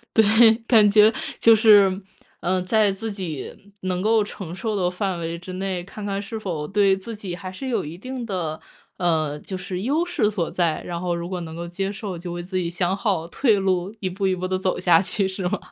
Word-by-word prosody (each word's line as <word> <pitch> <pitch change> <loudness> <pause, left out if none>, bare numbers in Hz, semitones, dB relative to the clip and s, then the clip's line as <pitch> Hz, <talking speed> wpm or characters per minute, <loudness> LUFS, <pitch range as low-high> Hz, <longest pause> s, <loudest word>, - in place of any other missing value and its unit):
对， 220 +1 +6
感 215 -4 +6
觉 210 +1 +6 0.3
就 230 -1 +7
是， 205 -3 +5 0.4
呃， 185 +1 0
在 210 +2 +3
自 220 +3 -5
己 190 +1 -7
能 185 -1 -2
够 220 +2 +3
承 190 -5 -7
受 215 +3 -3
的 180 -3 0
范 185 -1 -2
围 165 0 -4
之 185 +1 -8
内， 185 -1 -3
看 205 +1 -8
看 200 0 -2
是 220 +2 -6
否 165 -8 -4
对 195 -1 +3
自 225 +4 -7
己 195 -4 -6
还 185 +1 -6
是 260 +8 -6
有 235 - -1
一 165 +3 -7
定 255 +3 -6
的， 175 -7 -3 0.4
呃， 155 -4 0
就 190 - -7
是 185 0 -5
优 305 +7 +1
势 250 -12 +1
所 180 -6 -2
在， 170 -3 0
然 170 -1 -4
后 175 -1 -1
如 170 +1 -5
果 185 - -3
能 160 -1 -7
够 170 - -5
接 195 +3 -3
受， 195 -3 -5
就 175 0 -6
为 175 0 -5
自 185 +1 -4
己 170 -2 -1
想 180 +2 0
好 195 -6 -1
退 230 -1 +3
路， 190 +1 0
一 185 - -1
步 195 +2 -1
一 185 - +1
步 185 +1 -4
地 185 0 -1
走 185 -1 0
下 175 -2 +4
去 195 +1 0
是 190 -1 -2
吗？ 210 - -1
190 Hz, 245 characters per minute, -23 LUFS, 175-210 Hz, 0.4 s, 就